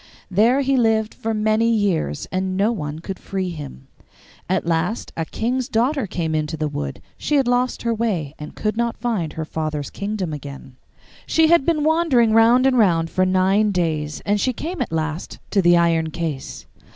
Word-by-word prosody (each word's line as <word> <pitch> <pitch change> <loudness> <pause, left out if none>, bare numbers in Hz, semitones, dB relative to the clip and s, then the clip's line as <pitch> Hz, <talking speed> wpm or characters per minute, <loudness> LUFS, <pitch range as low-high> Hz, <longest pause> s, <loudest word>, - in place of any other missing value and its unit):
There 230 +8 +4
he 270 0 +1
lived 220 -2 +2
for 225 - -3
many 215 +1 +2
years, 195 - 0
and 185 0 -1
no 205 +4 +2
one 150 -9 -4
could 185 +4 -7
free 190 -2 -3
him. 145 - -9 0.6
At 185 -2 0
last 170 +6 -1
a 165 - -2
king's 245 +7 -2
daughter 250 +1 +1
came 165 -3 -2
into 155 +1 -1
the 155 0 -1
wood; 70 - -5 0.2
she 300 - 0
had 270 -3 +3
lost 245 0 0
her 235 -1 +1
way, 195 -11 -2
and 150 - -8
could 215 0 -1
not 235 0 -1
find 215 -10 -2
her 160 - -4
father's 155 -3 -4
kingdom 200 -5 -3
again. 140 -3 -9 0.5
She 320 -1 +4
had 340 -5 +4
been 315 -3 +2
wandering 305 -8 +3
round 230 +3 +5
and 260 -2 +3
round 165 -6 +3
for 185 0 +2
nine 190 +3 +3
days, 160 -5 -1
and 205 0 +1
she 255 - +1
came 340 +9 -5
at - - -2
last 160 +1 -3
to 200 - +3
the 175 -1 +5
iron 165 -1 +2
case. 160 -5 -5
195 Hz, 190 wpm, -21 LUFS, 160-235 Hz, 0.6 s, round